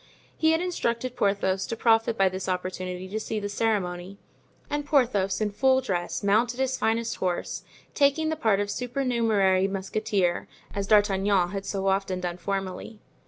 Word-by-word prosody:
He 320 Hz, -, +2 dB
had 320 Hz, +1 st, +2 dB
instructed 255 Hz, -8 st, -2 dB
Porthos 195 Hz, -4 st, +1 dB
to -, -, -3 dB
profit 225 Hz, 0 st, +2 dB
by 195 Hz, -, +4 dB
this 190 Hz, +1 st, -3 dB
opportunity 185 Hz, 0 st, -3 dB
to 210 Hz, +3 st, -3 dB
see 220 Hz, 0 st, -3 dB
the 205 Hz, -, -3 dB
ceremony; 195 Hz, -3 st, -1 dB, 0.5 s
and 295 Hz, 0 st, -2 dB
Porthos, 235 Hz, -10 st, +2 dB
in 215 Hz, -1 st, 0 dB
full 260 Hz, +5 st, +3 dB
dress, 185 Hz, -10 st, -2 dB
mounted 235 Hz, +5 st, +2 dB
his 265 Hz, 0 st, +1 dB
finest 230 Hz, -1 st, 0 dB
horse, 180 Hz, -2 st, -2 dB, 0.3 s
taking 290 Hz, +2 st, +2 dB
the 315 Hz, -, 0 dB
part 220 Hz, -9 st, +2 dB
of 205 Hz, 0 st, -1 dB
supernumerary 230 Hz, -7 st, +1 dB
musketeer, 195 Hz, -1 st, -1 dB, 0.3 s
as 200 Hz, -1 st, -3 dB
D'Artagnan 200 Hz, -3 st, +3 dB
had 195 Hz, +1 st, -5 dB
so 195 Hz, -1 st, -2 dB
often 190 Hz, -1 st, 0 dB
done 175 Hz, -1 st, -3 dB
formerly. 195 Hz, +3 st, -4 dB
205 Hz, 160 wpm, -26 LUFS, 190-235 Hz, 0.5 s, by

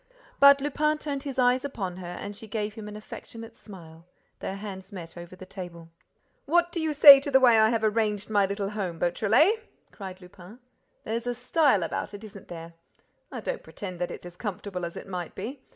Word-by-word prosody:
But 280 Hz, 0 st, +8 dB
Lupin 300 Hz, +2 st, +1 dB
turned 285 Hz, -2 st, -4 dB
his 275 Hz, -2 st, -6 dB
eyes 250 Hz, 0 st, +3 dB
upon 195 Hz, -10 st, -4 dB
her 175 Hz, -1 st, -7 dB
and 205 Hz, 0 st, -6 dB
she 220 Hz, -, -11 dB
gave 210 Hz, 0 st, -3 dB
him 215 Hz, -1 st, -8 dB
an 210 Hz, -, -8 dB
affectionate 225 Hz, +2 st, -10 dB
smile. 165 Hz, -5 st, -13 dB, 0.4 s
Their 190 Hz, -, -4 dB
hands 195 Hz, -2 st, -8 dB
met 175 Hz, -4 st, -9 dB
over 175 Hz, +1 st, -10 dB
the 185 Hz, -, -11 dB
table. 175 Hz, -3 st, -9 dB, 0.6 s
"What 345 Hz, +3 st, +3 dB
do 340 Hz, -, -3 dB
you 320 Hz, -1 st, 0 dB
say 285 Hz, -1 st, +10 dB
to 280 Hz, -, -5 dB
the 265 Hz, -1 st, +5 dB
way 240 Hz, -4 st, +6 dB
I 220 Hz, 0 st, +5 dB
have 225 Hz, -1 st, 0 dB
arranged 215 Hz, -2 st, 0 dB
my 205 Hz, -2 st, +2 dB
little 200 Hz, 0 st, -3 dB
home, 190 Hz, -5 st, -4 dB
Beautrelet?" 220 Hz, -, +3 dB, 0.3 s
cried 190 Hz, -2 st, -9 dB
Lupin. 180 Hz, +3 st, -14 dB, 0.5 s
"There's 230 Hz, +2 st, -3 dB
a 245 Hz, -, -1 dB
style 250 Hz, -, +2 dB
about 165 Hz, -, -4 dB
it, 205 Hz, -, -10 dB
isn't 205 Hz, -2 st, -11 dB
there? 165 Hz, -1 st, -9 dB, 0.6 s
I -, -, -6 dB
don't -, -, -4 dB
pretend 185 Hz, -4 st, -8 dB
that 175 Hz, -, -1 dB
it's -, -, -9 dB
as 175 Hz, 0 st, -11 dB
comfortable 195 Hz, -3 st, -5 dB
as 170 Hz, -, -7 dB
it -, -, -8 dB
might 180 Hz, -3 st, -6 dB
be. 260 Hz, +3 st, -6 dB
210 Hz, 205 wpm, -27 LUFS, 185-255 Hz, 0.6 s, say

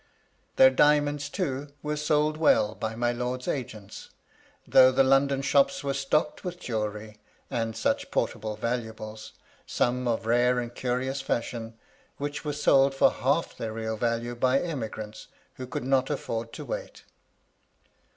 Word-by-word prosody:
Their 130 Hz, 0 st, +7 dB
diamonds, 145 Hz, +1 st, +3 dB
too, 145 Hz, -5 st, -3 dB
were 150 Hz, 0 st, -1 dB
sold 150 Hz, 0 st, +1 dB
well 110 Hz, -9 st, +3 dB
by 110 Hz, 0 st, -4 dB
my 120 Hz, +1 st, +1 dB
lord's 125 Hz, +1 st, -3 dB
agents, 115 Hz, -7 st, -5 dB, 0.6 s
though 130 Hz, 0 st, +7 dB
the 130 Hz, +1 st, +4 dB
London 135 Hz, +1 st, +3 dB
shops 140 Hz, +6 st, +2 dB
were 140 Hz, -1 st, -1 dB
stocked 140 Hz, +3 st, 0 dB
with 180 Hz, -1 st, -5 dB
jewellery, 105 Hz, -3 st, -4 dB, 0.3 s
and 115 Hz, -3 st, -2 dB
such 115 Hz, -, 0 dB
portable 110 Hz, -1 st, -2 dB
valuables, 110 Hz, -2 st, -5 dB, 0.3 s
some 125 Hz, +1 st, 0 dB
of 115 Hz, -1 st, -1 dB
rare 120 Hz, +2 st, +3 dB
and 120 Hz, -1 st, -3 dB
curious 130 Hz, +2 st, -2 dB
fashion, 115 Hz, -3 st, -3 dB, 0.4 s
which 145 Hz, 0 st, -4 dB
were 150 Hz, -, -2 dB
sold 140 Hz, -2 st, +3 dB
for -, -, +5 dB
half 140 Hz, +6 st, 0 dB
their 110 Hz, -1 st, -5 dB
real 110 Hz, 0 st, -3 dB
value 115 Hz, +1 st, -1 dB
by 130 Hz, +3 st, +2 dB
emigrants 110 Hz, -9 st, -5 dB, 0.3 s
who 130 Hz, -, -6 dB
could 125 Hz, -, -4 dB
not 135 Hz, 0 st, +2 dB
a£Pord 115 Hz, -5 st, -3 dB
to -, -, -7 dB
wait. -, -, -6 dB
125 Hz, 145 wpm, -27 LUFS, 115-140 Hz, 0.6 s, Their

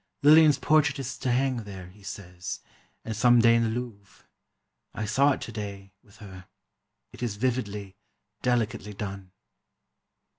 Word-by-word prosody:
Lillian's 150 Hz, -1 st, +7 dB
portrait 150 Hz, -1 st, +3 dB
is 130 Hz, -2 st, -4 dB
to 125 Hz, -, -1 dB
hang 130 Hz, +1 st, +1 dB
there, 95 Hz, -5 st, -8 dB
he 100 Hz, +3 st, -19 dB
says, 95 Hz, -3 st, -7 dB, 0.4 s
and 110 Hz, -, -4 dB
some 120 Hz, +2 st, +5 dB
day 115 Hz, 0 st, +6 dB
in 115 Hz, -, +3 dB
the 115 Hz, -, +1 dB
Louvre. 110 Hz, -4 st, -7 dB, 0.7 s
I 105 Hz, -, -3 dB
saw 135 Hz, +7 st, +3 dB
it -, -, -7 dB
today, 100 Hz, -3 st, -7 dB
with 105 Hz, 0 st, -21 dB
her. 95 Hz, -3 st, -12 dB, 0.7 s
It -, -, -12 dB
is 120 Hz, -4 st, -2 dB
vividly, 105 Hz, -5 st, -3 dB, 0.4 s
delicately 115 Hz, -4 st, -1 dB
done. 95 Hz, -2 st, -6 dB
110 Hz, 145 wpm, -27 LUFS, 100-125 Hz, 0.7 s, Lillian's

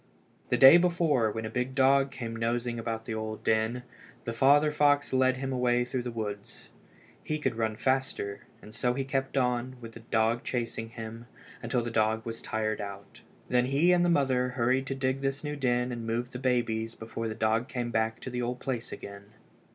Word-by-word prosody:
The -, -, +2 dB
day 135 Hz, +5 st, +10 dB
before, 170 Hz, -9 st, +2 dB
when 110 Hz, +1 st, -4 dB
a -, -, -3 dB
big 125 Hz, +2 st, -2 dB
dog 135 Hz, 0 st, +4 dB
came 115 Hz, -4 st, -6 dB
nosing 120 Hz, +1 st, -1 dB
about 115 Hz, -1 st, -4 dB
the 115 Hz, -, -4 dB
old 110 Hz, 0 st, -5 dB
den, 110 Hz, +3 st, +1 dB, 0.4 s
the 115 Hz, -, -3 dB
father 145 Hz, +5 st, +4 dB
fox 145 Hz, -2 st, +2 dB
led 130 Hz, 0 st, +3 dB
him 135 Hz, 0 st, -3 dB
away 125 Hz, -1 st, +2 dB
through 125 Hz, +1 st, -2 dB
the 120 Hz, -, -4 dB
woods. 105 Hz, -3 st, -6 dB, 0.5 s
He 155 Hz, -, -2 dB
could 135 Hz, -6 st, -1 dB
run 110 Hz, -1 st, 0 dB
the -, -, -13 dB
faster, 130 Hz, -6 st, -1 dB, 0.2 s
and 105 Hz, -, -12 dB
so 125 Hz, +2 st, 0 dB
he 135 Hz, -, -1 dB
kept 135 Hz, 0 st, -2 dB
on, 125 Hz, 0 st, 0 dB
with 115 Hz, -1 st, -9 dB
the 115 Hz, -, -11 dB
dog 115 Hz, +1 st, 0 dB
chasing 115 Hz, -2 st, -3 dB
him, 115 Hz, 0 st, -8 dB, 0.4 s
till 125 Hz, -2 st, +1 dB
the 120 Hz, -, -4 dB
dog 110 Hz, 0 st, +1 dB
was 115 Hz, 0 st, -5 dB
tired 110 Hz, -2 st, -2 dB
out. 100 Hz, -1 st, -9 dB, 0.3 s
Then 125 Hz, 0 st, +2 dB
he 145 Hz, +7 st, +3 dB
and 175 Hz, -1 st, +4 dB
the 175 Hz, -, +3 dB
mother 130 Hz, -5 st, +2 dB
hurried 130 Hz, +1 st, +1 dB
to 135 Hz, -, -2 dB
dig 135 Hz, 0 st, -1 dB
this 135 Hz, +1 st, -2 dB
new 150 Hz, 0 st, -3 dB
den 125 Hz, -2 st, 0 dB
and 120 Hz, -2 st, -5 dB
move 120 Hz, +2 st, -2 dB
the 125 Hz, -, -6 dB
babies 115 Hz, -3 st, 0 dB
before 115 Hz, 0 st, -5 dB
the 110 Hz, -, -4 dB
dog 110 Hz, +2 st, +1 dB
came 120 Hz, -3 st, -3 dB
back 110 Hz, 0 st, 0 dB
to 130 Hz, -, -6 dB
the 125 Hz, 0 st, -2 dB
old 120 Hz, +1 st, -3 dB
place 120 Hz, -3 st, -3 dB
again. 100 Hz, 0 st, -9 dB
120 Hz, 205 wpm, -29 LUFS, 115-135 Hz, 0.5 s, day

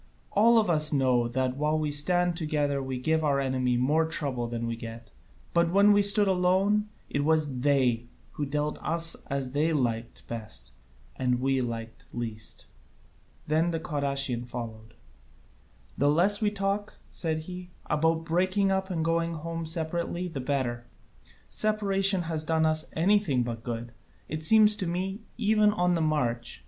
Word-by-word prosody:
All 230 Hz, +3 st, +5 dB
of 220 Hz, -, +3 dB
us 155 Hz, -3 st, +3 dB
know 130 Hz, -4 st, +2 dB
that 130 Hz, +1 st, -1 dB
while 150 Hz, +2 st, +1 dB
we 155 Hz, -1 st, -1 dB
stand 175 Hz, +4 st, +2 dB
together 150 Hz, -3 st, -1 dB
we 130 Hz, -1 st, -4 dB
give 160 Hz, +5 st, 0 dB
our 140 Hz, -2 st, +2 dB
enemy 130 Hz, -2 st, 0 dB
more 150 Hz, +6 st, +2 dB
trouble 135 Hz, -7 st, -1 dB
than 115 Hz, 0 st, -4 dB
we 115 Hz, 0 st, -2 dB
get: 115 Hz, 0 st, -9 dB, 0.4 s
but 170 Hz, 0 st, +3 dB
when 200 Hz, +3 st, +5 dB
we 205 Hz, -, +4 dB
stood 205 Hz, 0 st, +6 dB
alone 190 Hz, +3 st, +2 dB, 0.2 s
it 145 Hz, -, -1 dB
was 150 Hz, -4 st, +1 dB
they 125 Hz, -4 st, +2 dB, 0.2 s
who 145 Hz, -, -4 dB
dealt 150 Hz, +1 st, -2 dB
with -, -, -16 dB
us 165 Hz, 0 st, +1 dB
as 135 Hz, -2 st, -3 dB
they 155 Hz, +4 st, +1 dB
liked 120 Hz, -5 st, -2 dB
best 110 Hz, -2 st, -6 dB, 0.5 s
and 125 Hz, -1 st, 0 dB
we 135 Hz, 0 st, +1 dB
liked 115 Hz, -2 st, -5 dB
least." 115 Hz, -2 st, -5 dB, 0.8 s
Then 160 Hz, +3 st, +1 dB
the 165 Hz, -1 st, -2 dB
Cadousian 140 Hz, -6 st, -1 dB
followed. 115 Hz, -2 st, -8 dB, 1.0 s
"The 145 Hz, -, +4 dB
less 185 Hz, +8 st, +3 dB
we 210 Hz, -, +3 dB
talk," 200 Hz, 0 st, -3 dB
said 160 Hz, -3 st, -1 dB
he, 180 Hz, 0 st, -8 dB, 0.2 s
"about 160 Hz, +2 st, +1 dB
breaking 185 Hz, +4 st, +1 dB
up 190 Hz, 0 st, -1 dB
and 165 Hz, -3 st, -2 dB
going 165 Hz, 0 st, 0 dB
home 165 Hz, +1 st, -5 dB
separately 170 Hz, +2 st, -2 dB
the 145 Hz, -6 st, -5 dB
better; 125 Hz, -3 st, -2 dB, 0.6 s
separation 195 Hz, -3 st, +1 dB
has 160 Hz, -2 st, -2 dB
done 160 Hz, 0 st, +1 dB
us 155 Hz, 0 st, +1 dB
anything 170 Hz, -7 st, +2 dB
but 115 Hz, -1 st, -5 dB
good, 120 Hz, 0 st, -5 dB, 0.4 s
it 155 Hz, +1 st, -5 dB
seems 215 Hz, +4 st, +6 dB
to 185 Hz, -, 0 dB
me, 190 Hz, +4 st, -3 dB, 0.2 s
even 215 Hz, -2 st, +3 dB
on 180 Hz, -3 st, +1 dB
the 170 Hz, -, 0 dB
march. 125 Hz, -, -1 dB
155 Hz, 160 wpm, -27 LUFS, 130-180 Hz, 1.0 s, stood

